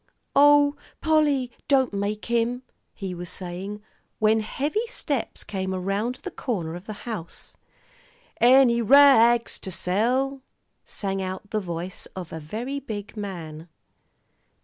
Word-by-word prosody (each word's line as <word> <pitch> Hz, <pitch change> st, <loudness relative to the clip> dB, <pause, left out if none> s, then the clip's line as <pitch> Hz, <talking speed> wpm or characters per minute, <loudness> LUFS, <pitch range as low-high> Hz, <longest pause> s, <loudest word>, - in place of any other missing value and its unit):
"Oh, 290 Hz, 0 st, +6 dB, 0.2 s
Polly, 295 Hz, -5 st, +2 dB, 0.2 s
don't 265 Hz, -5 st, +3 dB
make 205 Hz, +1 st, -2 dB
him," 235 Hz, +2 st, 0 dB, 0.3 s
he 190 Hz, -3 st, -6 dB
was 175 Hz, 0 st, -7 dB
saying, 190 Hz, +3 st, -6 dB, 0.3 s
when 215 Hz, +1 st, +3 dB
heavy 295 Hz, -, -2 dB
steps 290 Hz, -, -3 dB
came 190 Hz, -1 st, -3 dB
around 200 Hz, +6 st, -1 dB
the 380 Hz, -, -5 dB
corner 185 Hz, -, -3 dB
of 175 Hz, +3 st, -8 dB
the 215 Hz, -2 st, -8 dB
house. 210 Hz, -9 st, -7 dB, 0.8 s
"Any 240 Hz, 0 st, +6 dB
ra 240 Hz, -1 st, +7 dB
ags 230 Hz, -, -10 dB
to -, -, -6 dB
sell?" 250 Hz, +10 st, 0 dB, 0.4 s
sang 195 Hz, -1 st, -3 dB
out 190 Hz, +2 st, -6 dB
the 215 Hz, -, +1 dB
voice 175 Hz, -1 st, -6 dB
of 180 Hz, -4 st, -7 dB
a 160 Hz, -, -4 dB
very 230 Hz, -, -4 dB
big 215 Hz, -6 st, -7 dB
man. 170 Hz, -6 st, -7 dB
215 Hz, 130 wpm, -25 LUFS, 190-265 Hz, 0.8 s, ra